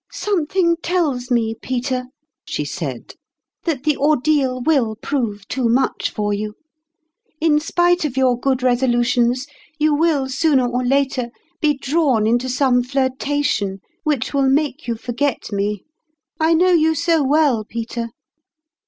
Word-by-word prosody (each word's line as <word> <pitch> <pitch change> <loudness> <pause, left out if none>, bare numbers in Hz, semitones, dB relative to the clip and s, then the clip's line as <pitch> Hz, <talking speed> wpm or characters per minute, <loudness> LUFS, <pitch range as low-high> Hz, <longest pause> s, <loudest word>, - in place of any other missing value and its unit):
" - - -39
Something 350 -3 0
tells 295 -9 -1
me, 230 -3 +1
Peter," 255 +2 -3 0.4
she - - -3
said, - - -5 0.3
" - - -66
that 300 -6 -1
the 300 -1 +2
ordeal 285 -3 +2
will 250 -5 +1
prove 220 -5 -3
too 255 -3 -1
much 255 +3 +1
for 205 -1 -2
you: 210 +1 -4 0.8
in 305 -2 +3
spite 350 +3 +2
of 275 -4 -3
your 260 -2 +3
good 260 +1 -1
resolutions, 245 0 +2 0.3
you 305 -1 +2
will 295 -3 +2
sooner 265 0 +2
or 245 +1 -1
later 265 -1 0 0.3
be 300 -2 +3
drawn 270 -6 +1
into 240 +3 +1
some 255 -1 +2
flirtation 260 -5 -1 0.3
which 295 -6 -1
will 275 -1 +2
make 290 0 0
you 235 - -1
forget 245 +4 -2
me. 205 0 -2 0.6
I 320 +1 +3
know 365 +3 +4
you 320 -2 +3
so 330 +1 +2
well, 280 -5 +2
Peter!" 230 +1 -5
265 Hz, 145 wpm, -20 LUFS, 240-300 Hz, 0.8 s, know